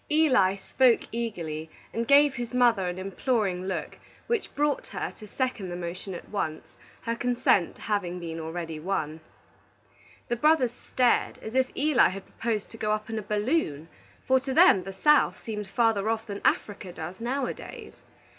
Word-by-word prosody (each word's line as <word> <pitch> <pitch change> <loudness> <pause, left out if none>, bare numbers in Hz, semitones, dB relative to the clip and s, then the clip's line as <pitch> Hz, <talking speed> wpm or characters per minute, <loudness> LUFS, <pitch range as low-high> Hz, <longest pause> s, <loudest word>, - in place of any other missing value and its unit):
Eli 260 -12 +4
spoke 240 +5 +3
eagerly, 170 -9 -4 0.2
and 230 0 -2
gave 285 0 +6
his 240 0 -5
mother 235 -7 +4
an 180 0 -3
imploring 195 -1 -1
look 190 - -4 0.3
which 470 -3 -1
brought 295 0 0
her - - -4
to 215 - -13
second 235 -4 -2
the 175 - -4
motion 180 +2 -5
at - - -9
once, 160 -7 -4 0.3
her 230 - -1
consent 245 -7 +2
having 185 -4 -2
been 165 -1 -5
already 160 0 -5
won. 160 -3 -2 1.1
The 240 - -1
brothers 300 -3 +4
stared 245 0 +1
as 220 - -6
if 260 0 +2
Eli 295 -2 +4
had 195 0 -7
proposed 225 -3 -3
to 225 - -10
go 215 -1 -1
up 215 +1 -3
in 220 - -2
a - - -4
balloon, 210 - -1 0.4
for 260 0 +5
to 265 0 -4
them 185 -2 +6
the 195 - -6
South 300 +10 +3
seemed 210 -3 -4
farther 220 0 +2
off 225 0 -1
than 200 -2 -6
Africa 200 -3 0
does 175 +3 -7
nowadays. 255 +2 -4
215 Hz, 165 wpm, -27 LUFS, 185-250 Hz, 1.1 s, gave